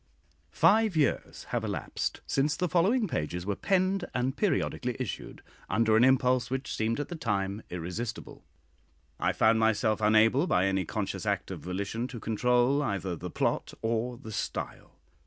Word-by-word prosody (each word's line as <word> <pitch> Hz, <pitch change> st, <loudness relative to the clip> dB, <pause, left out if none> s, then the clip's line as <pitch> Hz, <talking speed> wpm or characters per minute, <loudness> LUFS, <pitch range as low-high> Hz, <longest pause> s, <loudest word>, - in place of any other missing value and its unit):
Five 205 Hz, +2 st, +4 dB
years 145 Hz, -5 st, 0 dB
have -, -, -1 dB
elapsed -, -, -3 dB
since 145 Hz, +2 st, +1 dB
the 180 Hz, -, 0 dB
following 200 Hz, +8 st, +2 dB
pages 90 Hz, -, -3 dB
were 100 Hz, 0 st, -1 dB
penned, 190 Hz, -, +1 dB
and 130 Hz, +2 st, 0 dB
periodically 125 Hz, -, 0 dB
issued, 130 Hz, -6 st, -5 dB, 0.3 s
under 110 Hz, +2 st, +3 dB
an 115 Hz, -, +5 dB
impulse 130 Hz, -1 st, +3 dB
which 135 Hz, +1 st, -3 dB
seemed 110 Hz, +3 st, 0 dB
at 145 Hz, -, -3 dB
the 175 Hz, -, -4 dB
time 100 Hz, -6 st, -2 dB
irresistible. 90 Hz, +7 st, -5 dB, 0.8 s
I -, -, +2 dB
found 110 Hz, 0 st, +3 dB
myself 110 Hz, -1 st, +2 dB
unable, 110 Hz, +8 st, +4 dB
by 95 Hz, -, +3 dB
any 95 Hz, -1 st, 0 dB
conscious -, -, -3 dB
act -, -, -1 dB
of -, -, -5 dB
volition, 100 Hz, +6 st, -3 dB
to 125 Hz, -2 st, -8 dB
control 125 Hz, +5 st, +2 dB
either 95 Hz, -, -2 dB
the -, -, -6 dB
plot -, -, -1 dB
or 115 Hz, +2 st, -1 dB
the 115 Hz, -3 st, -9 dB
style. -, -, -5 dB
120 Hz, 155 wpm, -29 LUFS, 105-140 Hz, 0.8 s, an